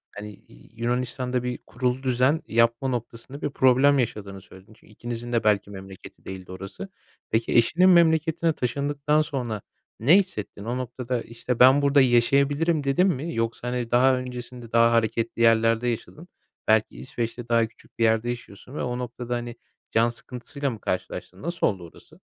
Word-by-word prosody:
hani, 105 +1 -7 0.2
Y - - -19
Yunanistan'da 125 +1 -2
bir 125 -1 -3
kurulu 125 +2 -2
düzen 130 +4 +2
yapma 115 +3 +2
noktasında 120 +2 -5
bir 145 - -1
problem 135 +1 +4
yaşadığını 100 -5 -3
söyledin. 95 +3 -16
Çünkü 110 - -22
ikinizin 120 +1 -6
de 115 - +1
belki 105 -2 +2
memleketi 95 -1 -12
değildi 95 -1 -8
orası. 95 - -8 0.4
Peki, 115 +1 0
eşinin 170 +11 +5
memleketine 165 -1 +3
taşındıktan 145 +3 0
sonra 125 - -3 0.4
ne 145 - +6
hissettin? 145 - -3
O 120 +2 -2
noktada, 125 -1 -3
işte, 115 +1 -5
“Ben 130 +3 +7
burada 140 0 +4
yaşayabilirim.” 140 +6 +2
dedin 140 +8 +2
mi 165 0 -2
yoksa, 115 +1 -2
hani, 125 -1 -3
daha 130 +2 +5
öncesinde 125 -2 -7
daha 115 0 +5
hareketli 115 0 0
yerlerde 115 +1 +3
yaşadın. 150 +8 -5 0.4
Belki, 110 0 +2
İsveç'te 120 -1 -5
daha 115 -1 +3
küçük 110 - -23
bir - - +2
yerde 115 +1 +2
yaşıyorsun 120 +1 -8
ve - - -3
o 125 0 -2
noktada, 125 0 -4
hani, 120 -1 -5 0.4
can 115 +1 +3
sıkıntısıyla 125 +4 -5
mı 115 -4 -7
karşılaştın? 90 0 -4
Nasıl 170 +2 0
oldu 95 -4 -3
orası? - - -19
120 Hz, 160 wpm, -25 LUFS, 115-135 Hz, 0.4 s, Ben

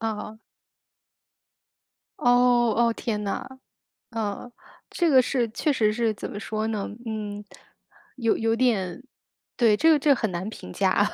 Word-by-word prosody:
哦。 220 -1 -4 1.8
哦， 245 -2 +4
哦， 235 0 +3
天 215 -2 -3
呐。 200 - -3 0.7
呃， 225 +1 -4 0.4
这 345 -2 +1
个 265 -3 +6
是 250 -1 0
确 300 +7 0
实 215 -5 +2
是 225 0 0
怎 205 - -7
么 205 - -6
说 215 0 -3
呢？ 215 -3 -2 0.2
嗯， 210 -2 -5 0.7
有 230 -3 +1
有 225 0 +1
点 230 -4 0 0.5
对， 225 -4 +4
这 320 +9 +3
个 310 - +5
这 295 - +1
个 - - +6
很 220 -5 -2
难 175 +3 -4
评 - - -10
价， 195 +1 +2
225 Hz, 155 characters per minute, -25 LUFS, 210-245 Hz, 1.8 s, 个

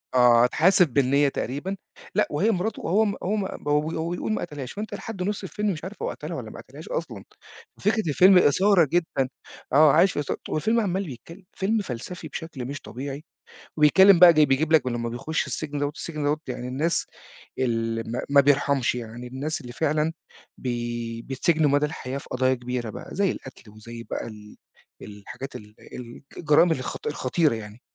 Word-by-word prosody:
آه 120 -1 +6
اتحاسب 175 +6 +4
بالنِيّة 140 +1 +3
تقريبًا، 150 +11 -4 0.4
لأ، 210 - +3
وهي 195 +10 +2
مراته، 200 +3 -2
هو 210 +6 +2
م 200 - 0
وهو 200 +4 -1
م 200 -2 -1 0.2
هو 160 +3 0
بي 175 - -2
بيقول - - -3
ما - - -2
قتلهاش، 145 -6 -6
فأنت 210 +2 -6
لحد 195 -5 -5
نُص 205 0 -3
الفيلم 210 +2 -2
مش 155 - -8
عارف 195 +3 -8
هو - - -1
قتلها - - -6
والّا - - -7
ما - - -10
قتلهاش - - -12
أصلًا. - - -4 0.6
فكرة 210 -4 +1
الفيلم 185 +5 +6
إثارة 180 +1 +4
جدًا، 160 -7 0 0.4
آه 150 0 +7
عايش 175 +3 +5
في - - -3
إثا 145 - -2
والفيلم 220 +9 +1
عمّال 190 -4 -1
يتكلّم، 165 +9 -11
فيلم 210 +3 0
فلسفي 155 +4 -6
بشكل 145 -5 -7
مش 140 +2 -6
طبيعي. 140 +4 -7 0.5
وبيتكلّم 185 +5 +7
بقى 175 -2 +9
جاي 155 -1 +5
بيجيب 145 +4 +1
لك 140 -5 +4
لمّا 120 -1 -2
بيخُش 140 +7 -2
السجن 145 -2 -4
دوّة، 145 0 0
السجن 155 -3 -5
دوّة 145 +1 +1
يعني 125 0 -5
الناس 150 +7 0 0.5
ال 115 -2 -1
ما 120 - -2
ما 140 0 +6
بيرحَمش 140 -2 +2
يعني 120 +1 -7
الناس 145 +5 -4
اللي 120 -1 -9
فعلًا 155 +2 0 0.4
بي 120 -2 -4
بيتسجنوا 150 +4 +1
مدى 145 +1 +3
الحياة 135 -3 -5
في - - -10
قضايا 130 +1 +2
كبيرة 120 -2 -4
بقى - - -9
زي 195 -1 +2
القتل 125 -4 -10
وزي 115 +2 -10
بقى - - -5
ال 105 -1 -12 0.4
الحاجات 105 +6 -9
ال 105 0 -11 0.6
الجرائم 160 +2 +4
الخط 130 -5 -4
الخطيرة 145 -1 +1
يعني. 105 +1 -9
145 Hz, 180 wpm, -25 LUFS, 125-175 Hz, 0.6 s, بقى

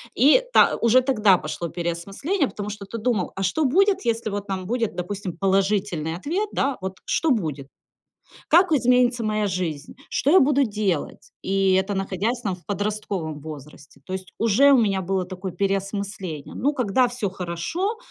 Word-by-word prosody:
и 290 - +6
та - - +6
уже 235 +2 +4
тогда 215 -8 +4
пошло 165 +2 -5
переосмысление, 195 - -2
потому 205 0 -6
что 205 -1 -7
ты 230 - -6
думал, 220 -5 -1
а 195 - -3
что 305 +12 +1
будет, 390 +7 +3
если 230 -1 0
вот 205 0 -4
там 190 -1 -3
будет, 230 -1 -1
допустим, 180 -1 -5
положительный 195 -4 0
ответ, 360 - -2
да, 275 -1 0
вот 190 0 -4
что 320 -3 +1
будет, 150 - -2 0.8
как 350 +1 +5
изменится 250 -3 +3
моя 215 -1 0
жизнь, 170 -6 -4 0.2
что 285 - +1
я 375 - +8
буду 280 0 +3
делать. 205 - -2
И 195 0 +2
это 190 +2 +1
находясь 195 +5 -2
там 195 -5 -2
в 175 - -22
подростковом 205 -6 -3
возрасте. 150 -1 -11
То 185 - -6
есть 190 -1 -6
уже 230 +6 +5
у 270 - +6
меня 195 -3 +1
было 190 0 -1
такое 185 0 -6
переосмысление. 195 -4 -3
Ну, 290 +3 0
когда 250 -1 +2
всё 240 -5 -3
хорошо, 190 - -3
200 Hz, 170 wpm, -23 LUFS, 185-245 Hz, 0.8 s, я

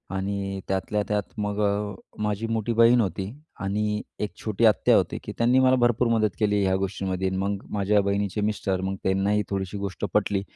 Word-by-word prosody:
आणि 100 0 -2
त्यातल्या 95 +2 -1
त्यात 105 -1 -2
मग 105 0 -2
अ, 100 0 0 0.3
माझी 105 +1 -1
मोठी 115 0 -1
बहीण 115 +1 +6
होती 95 0 -3 0.3
आणि 105 +2 -1 0.2
एक 105 - -2
छोटी 110 +1 +1
आत्या 110 -2 +5
होती, - - 0
की - - -6
त्यांनी 120 +3 +4
मला 130 0 +5
भरपूर 120 -1 +2
मदत 110 -2 +2
केली 105 -2 +2
ह्या 95 -1 +2
गोष्टींमध्ये. 95 -1 -2
मग 95 +1 -2
माझ्या 105 0 +2
बहिणीचे 100 0 -1
मिस्टर 100 -3 -1
मग 95 +1 -2
त्यांनाही 100 +2 +2
थोडीशी 95 0 -3
गोष्ट 100 0 -4
पटली, 100 -1 +1
100 Hz, 175 wpm, -25 LUFS, 95-105 Hz, 0.3 s, बहीण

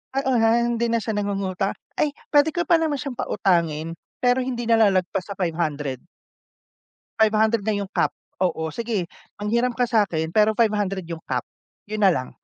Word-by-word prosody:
Oo, 265 -2 +1
ha, 225 +1 +4
na 235 - +1
hindi 235 0 0
na 230 - +2
siya 220 0 -3
nangungutang. 195 -2 -1 0.2
Ay, 300 - +1 0.2
puwede 290 +1 +4
ko 345 +1 -2
pa 345 - +6
naman 315 -4 0
siyang 275 -2 -5
pautangin 165 -8 0 0.2
pero 250 +1 +2
hindi 240 -2 -3
na 230 - +5
lalagpas 190 -4 +2
sa 195 - -6
500. 150 -6 -2 1.2
500 220 0 +3
na 215 -1 +1
yung 200 -1 -3
cap. - - +1 0.3
Oo, 160 -3 0
sige 225 -6 -2 0.3
manghiram 235 +4 +1
ka 245 - +2
sa'kin 175 -8 +1
pero 215 0 +4
500 205 -5 +1
yung 165 -1 -5
cap, 125 -2 -1 0.5
yun 215 0 -3
na 190 - +7
lang. 130 -3 -3
215 Hz, 175 wpm, -23 LUFS, 185-235 Hz, 1.2 s, na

